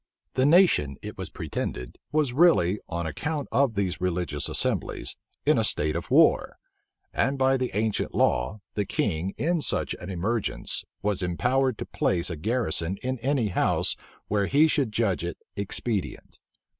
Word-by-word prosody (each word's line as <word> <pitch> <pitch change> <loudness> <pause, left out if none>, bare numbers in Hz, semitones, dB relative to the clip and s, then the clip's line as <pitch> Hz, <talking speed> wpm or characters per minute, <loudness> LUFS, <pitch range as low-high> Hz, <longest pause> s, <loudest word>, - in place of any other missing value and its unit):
The 130 +1 +3
nation, 150 - +4
it - - -6
was - - -6
pretended, 60 0 -5
was 150 -4 +1
really, 115 - +4
on 85 0 -3
account 145 - -3
of 125 -1 +2
these 95 -3 -1
religious 85 -5 -1
assemblies, - - -1 0.3
in 150 -4 +4
a - - +2
state 75 -7 +2
of 85 0 -4
war; - - +4 0.6
and 140 +1 +1
by 135 0 +3
the 130 -1 -1
ancient 110 0 -1
law, 65 - +1
the 105 - 0
king, 95 -2 -1
in 165 +1 +1
such - - 0
an 90 - -7
emergence, 100 +5 -1 0.2
was 100 -2 +1
empowered 125 +8 +1
to - - -5
place 85 0 0
a - - -3
garrison 95 -2 -1
in 130 0 -2
any 130 -3 +1
house 90 - +2 0.3
where 100 -2 +1
he 145 +3 +5
should 140 -7 +1
judge 105 -5 0
it 85 0 -4 0.2
expedient. 100 +1 -3
105 Hz, 155 wpm, -26 LUFS, 90-130 Hz, 0.6 s, he